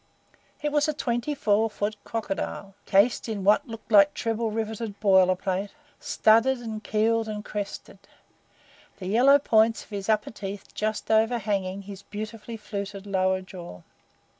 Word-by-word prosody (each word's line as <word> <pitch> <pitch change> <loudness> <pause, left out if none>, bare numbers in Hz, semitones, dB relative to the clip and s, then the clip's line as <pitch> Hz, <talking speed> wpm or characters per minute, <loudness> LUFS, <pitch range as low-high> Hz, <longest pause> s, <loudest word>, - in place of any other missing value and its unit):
It 295 - 0
was 295 +1 +2
a 305 - -1
twenty 245 +1 -1
four 220 -4 +2
foot 210 0 -3
crocodile, 200 -2 -4
cased 210 +4 +3
in 205 -3 -3
what 210 +8 +4
looked 225 0 -10
like 200 -2 +6
treble 225 0 -1
riveted 220 -1 -4
boiler 190 -3 +5
plate, 190 +2 -2 0.3
studded 230 +5 +3
and 220 -2 -6
keeled 225 +1 +1
and 210 -1 -5
crested; 205 -1 -6 1.0
the 185 - -8
yellow 250 +9 +5
points 225 -4 +3
of - - -23
his 200 0 -5
upper 215 -1 +1
teeth 200 -2 -8
just 215 +1 -2
overhanging 210 -4 +1
his 195 -1 -9
beautifully 215 +2 -7
fluted 200 -2 -6
lower 190 -1 +1
jaw. 175 - -10
215 Hz, 145 wpm, -26 LUFS, 200-225 Hz, 1.0 s, like